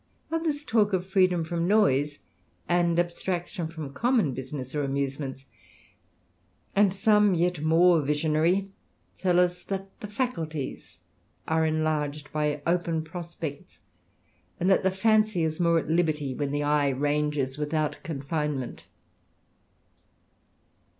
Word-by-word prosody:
Others 320 -3 -1
talk 215 -7 +2
of 185 -1 0
freedom 185 -3 +2
from 170 +1 -2
noise, 145 -8 +3 0.5
and 175 -1 +2
abstraction 175 0 -2
from 160 -4 -7
common 235 - +2
business 130 0 -6
or 150 -1 -1
amusements; 135 -1 -3 1.3
and 200 -1 +5
some, 210 0 +3
yet 175 -2 0
more 165 +1 +5
visionary, 155 +6 +1 0.5
tell 180 -2 +2
us, 180 0 +1
that 195 0 -4
the 210 - -6
faculties 165 - -4 0.5
are 160 0 +2
enlarged 155 -2 -1
by 150 -1 -1
open 170 -2 0
prospects, 165 -3 -7 0.8
and 185 +3 +2
that - - +4
the 190 - +2
fancy 215 -1 +2
is 155 +1 -2
more 170 -1 +3
at 160 - -1
liberty, 155 -5 +1
when 145 +2 -2
the 145 +1 -1
eye 145 -1 +2
ranges 145 0 -1
without 150 0 -1
confinement. 150 -3 -3
160 Hz, 120 wpm, -27 LUFS, 150-185 Hz, 1.3 s, and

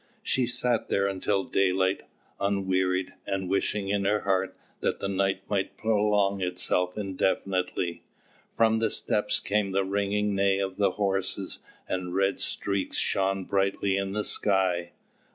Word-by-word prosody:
She 130 -2 +2
sat 120 -1 +1
there 100 - +2
until 100 0 0
daylight, 95 0 +1 0.3
unwearied, 95 -2 0
and 95 -1 -2
wishing 100 +1 0
in 100 0 +1
her 105 +1 +2
heart 95 -1 0 0.2
that - - -1
the - - -2
night 95 0 0
might 100 -2 -2
prolong 105 -2 +2
itself 90 0 -1
indefinitely. 95 -3 -1 0.6
From 110 0 +4
the 115 - +2
steppes 105 0 +1
came 100 0 0
the 95 0 +1
ringing 100 +1 0
neigh 100 0 +2
of 95 -1 -3
the 100 -3 +2
horses, 95 -1 -1 0.3
and 90 -1 -3
red 95 0 +1
streaks 100 -2 -1
shone 95 -1 +1
brightly 100 0 +1
in 100 0 -2
the 105 0 0
sky. 90 -5 +1
95 Hz, 140 wpm, -27 LUFS, 95-100 Hz, 0.6 s, From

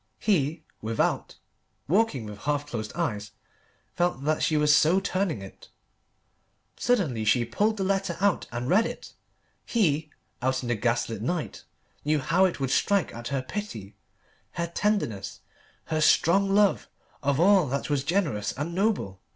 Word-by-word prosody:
He, 160 -5 0 0.2
without, 110 +1 -1 0.5
walking 170 - +1
with 105 -1 -8
half 145 +3 -1
closed 110 -7 -5
eyes, 105 -12 -3 0.6
felt 175 -6 0
that 155 +1 0
she 155 - +2
was 150 0 +5
so 160 +5 +4
turning 185 - -1
it. 95 - -13 1.1
Suddenly 165 - 0
she 115 +3 +3
pulled 215 - 0
the 195 - -1
letter 195 -2 -1
out 200 -1 +1
and 120 +1 -4
read 205 +9 +4
it. - - -9 0.5
He, 160 -9 +1 0.3
out 130 +1 0
in 120 - -4
the 120 - +2
gas 115 +2 0
lit 110 -3 -5
night, 160 +7 -3 0.4
knew 150 +1 +2
how 170 +6 +3
it 180 - -1
would 135 -1 -1
strike 200 -8 +2
at 115 +1 -7
her 135 -2 -2
pity, 130 - -6 0.6
her 170 - -2
tenderness, 170 - -2 0.4
her 155 -1 -1
strong 195 +6 +4
love 200 0 +3 0.3
of 140 0 +1
all 190 -2 +5
that 140 +3 -3
was 140 -2 +1
generous 155 - 0
and 150 +5 -4
noble. 185 - -1
150 Hz, 155 wpm, -27 LUFS, 120-190 Hz, 1.1 s, was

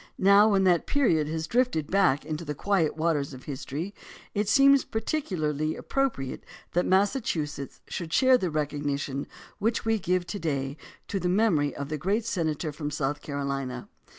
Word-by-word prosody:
Now, 200 +3 +6
when 195 -2 +3
that 180 -2 +3
period 170 - +2
has 160 +1 -2
drifted 230 - 0
back 185 -8 +3
into 155 +1 -4
the 150 -2 -4
quiet 170 -2 +1
waters 150 -4 0
of 130 - -12
history, 150 +6 -5 0.4
it 205 0 0
seems 275 +2 +6
particularly 160 - -2
appropriate 255 - -2 0.3
that 175 - +1
Massachusetts 185 - 0
should 170 -3 -5
share 260 +7 +5
in 250 - +6
the 185 - -1
recognition 145 -2 -2 0.3
which 225 +3 0
we 225 -1 +2
give 180 -1 0
to 200 +3 -5
day 140 -4 -2 0.3
to 195 - -2
the 180 0 -1
memory 180 -8 +2
of 140 0 -5
the 155 -1 -3
great 205 +7 0
senator 160 -6 -1
from 150 0 -4
South 145 0 -2
Carolina. 140 -3 -4
165 Hz, 165 wpm, -27 LUFS, 145-205 Hz, 0.4 s, Now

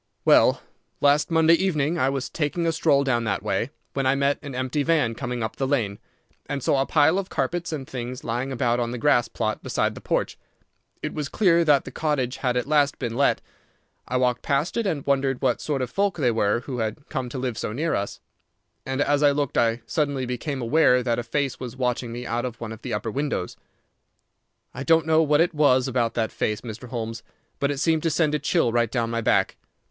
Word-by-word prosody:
"Well, - - +5 0.4
last 145 +1 +3
Monday 165 0 +5
evening 170 -3 +1
I 130 - +3
was 135 -1 -2
taking 165 +2 -2
a 165 - +2
stroll 155 -3 +3
down 120 -4 +1
that 100 -2 -1
way, 105 +3 -1 0.2
when 135 -1 0
I 135 - +3
met 140 +1 +1
an 140 -3 -7
empty 130 +3 -1
van 145 -6 +2
coming 120 0 -4
up 110 - -4
the 135 -2 -1
lane, 110 -8 -1 0.5
and 140 -2 -3
saw 135 - +2
a 135 - -1
pile 160 +4 +4
of 195 - -5
carpets 175 -1 -2
and 140 -4 -5
things 125 0 -6
lying 120 +4 -2
about 120 -2 +1
on 120 -1 -1
the 125 - -4
grass 120 -1 +3
plot 110 -2 -3
beside - - -1
the - - -10
porch. - - -1 0.6
It - - -3
was 150 -2 -3
clear 170 -4 +3
that 145 -3 +4
the - - -7
cottage 135 -5 -1
had 125 -2 0
at 125 - 0
last 145 -1 +2
been 120 -3 -4
let. 140 +2 +2 0.7
I 125 - 0
walked 125 -1 +1
past 140 +4 0
it, 230 -3 0
and 155 -7 -2
wondered 135 -2 +1
what 130 -3 0
sort 140 -4 -1
of 125 - -5
folk 200 -1 0
they 130 -6 +2
were 110 0 +1
who 130 -1 -5
had 110 +6 -4
come 130 -2 -3
to 125 - -6
live 125 -2 -2
so 105 - -3
near 155 +9 -1
us. 100 - -3 0.7
And 130 +1 -1
as 145 0 +2
I 145 - +6
looked 140 -1 -1
I 115 0 +1
suddenly 140 +1 -1
became 125 +2 -3
aware 125 -1 +4
that 120 -1 0
a - - -3
face 135 +3 -2
was 125 0 -7
watching 125 -2 -1
me 120 +1 -6
out 120 0 -2
of 125 -2 -5
one 115 -2 -6
of 110 - -9
the - - -6
upper 105 +2 -2
windows. 140 -9 -2 1.2
"I 125 - -7
don't 165 +2 +3
know 160 0 +4
what 150 -2 +3
there 170 +3 +3
was 135 -4 +3
about 120 -3 0
that 110 -2 0
face, 105 0 -2
Mr. 120 +1 -8
Holmes, 115 -1 -4 0.4
but 140 - +1
it 145 - -2
seemed 160 +2 +2
to 165 - +1
send 155 -1 +1
a 150 - +1
chill 150 -3 +1
right 120 -1 +1
down 115 -1 -1
my 115 0 -1
back. - - +1
135 Hz, 225 wpm, -24 LUFS, 120-150 Hz, 1.2 s, I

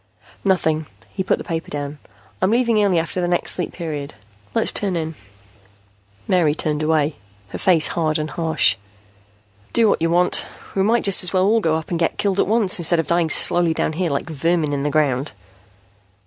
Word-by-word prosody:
"Nothing." 160 -5 +1 0.3
He 190 - -3
put 185 - +1
the - - -7
paper 165 -3 -4
down. 145 0 -5 0.4
"I'm 185 - +3
leaving 230 -2 +2
early 190 -4 +2
after 165 +2 -2
the 175 - 0
next 175 0 0
Sleep 180 - -2
Period. 150 -6 -6 0.4
Let's - - +3
turn 195 -3 -1
in." 160 -1 -3 1.1
Mary 165 -5 +2
turned 150 -1 -2
away, 155 -1 +1 0.3
her - - -7
face 170 -4 +4
hard 155 -2 0
and 155 -1 -4
harsh. 160 -1 +1 1.0
"Do 230 -1 +4
what - - +1
you 165 - +1
want. 180 +1 +2 0.3
We 195 - 0
might 230 +4 +2
just 195 -2 +3
as 180 - -1
well 185 0 +3
all 220 +3 +3
go 160 -6 +1
up 160 +2 -5
and 170 - -1
get 165 - 0
killed 200 -1 0
at - - +2
once, 210 -3 +2
instead 170 0 +3
of 165 - 0
dying 170 -1 +1
slowly 170 0 +3
down 160 - -1
here, 175 +1 -1
like 140 +3 -2
vermin 160 0 0
in 140 - -1
the 145 - -1
ground." 145 -2 0
165 Hz, 195 wpm, -20 LUFS, 155-185 Hz, 1.1 s, face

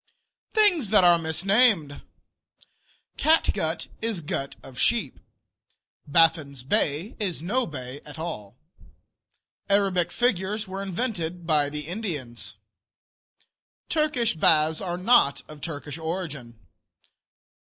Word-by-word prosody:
THINGS 375 - +3
THAT 210 -2 +5
ARE 175 -1 +6
MISNAMED 165 - +2 1.2
Catgut 320 +1 +2 0.2
is 220 -6 -2
gut 140 -2 -4
of 130 -2 -11
sheep. 235 -1 +1 0.9
Baffin's 155 -4 +3
Bay 150 - 0
is 180 -7 -2
no 245 +8 0
bay 130 -2 -7
at 145 -2 -10
all. 160 -12 -6 1.1
Arabic 190 -4 +2
figures 210 -2 0
were 190 +1 -5
invented 180 -4 -3
by 150 -3 +2
the 150 +1 -4
Indians. 160 - -5 1.3
Turkish 300 -7 +1
baths 160 -1 +3
are 175 -2 -3
not 180 - +3
of 155 -1 -12
Turkish 145 -1 -6
origin. 160 -8 -5
170 Hz, 100 wpm, -25 LUFS, 150-205 Hz, 1.3 s, ARE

